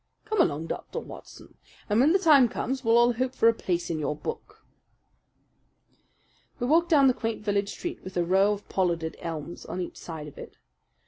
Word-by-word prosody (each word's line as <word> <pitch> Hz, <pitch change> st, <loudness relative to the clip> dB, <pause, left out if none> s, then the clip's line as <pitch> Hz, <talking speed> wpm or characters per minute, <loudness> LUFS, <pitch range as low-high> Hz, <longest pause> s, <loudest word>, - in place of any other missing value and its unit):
"Come 435 Hz, 0 st, +1 dB
along, 150 Hz, +2 st, 0 dB
Dr. -, -, -6 dB
Watson, -, -, -10 dB, 0.3 s
and 210 Hz, +1 st, +2 dB
when 280 Hz, +5 st, +5 dB
the 380 Hz, -, +5 dB
time 295 Hz, -10 st, +5 dB
comes 260 Hz, +2 st, -3 dB
we'll 230 Hz, 0 st, +4 dB
all 240 Hz, +1 st, +5 dB
hope 255 Hz, +2 st, -2 dB
for 230 Hz, -, +4 dB
a 230 Hz, -, +6 dB
place 175 Hz, -5 st, -2 dB
in 160 Hz, -, -2 dB
your 150 Hz, 0 st, -2 dB
book." 150 Hz, -, -8 dB, 1.9 s
We 245 Hz, -, -1 dB
walked 330 Hz, +6 st, +3 dB
down 290 Hz, -5 st, +5 dB
the 260 Hz, -, +5 dB
quaint 225 Hz, -2 st, -4 dB
village 200 Hz, -1 st, 0 dB
street 350 Hz, -, -6 dB
with 185 Hz, -1 st, -7 dB
a 175 Hz, -, +1 dB
row 190 Hz, +3 st, +3 dB
of 205 Hz, 0 st, -5 dB
pollarded 170 Hz, -4 st, -1 dB
elms 165 Hz, -1 st, -6 dB
on 185 Hz, -, -6 dB
each 180 Hz, -, -5 dB
side 160 Hz, -3 st, -7 dB
of 145 Hz, -, -12 dB
it. -, -, -11 dB
210 Hz, 195 wpm, -27 LUFS, 170-255 Hz, 1.9 s, a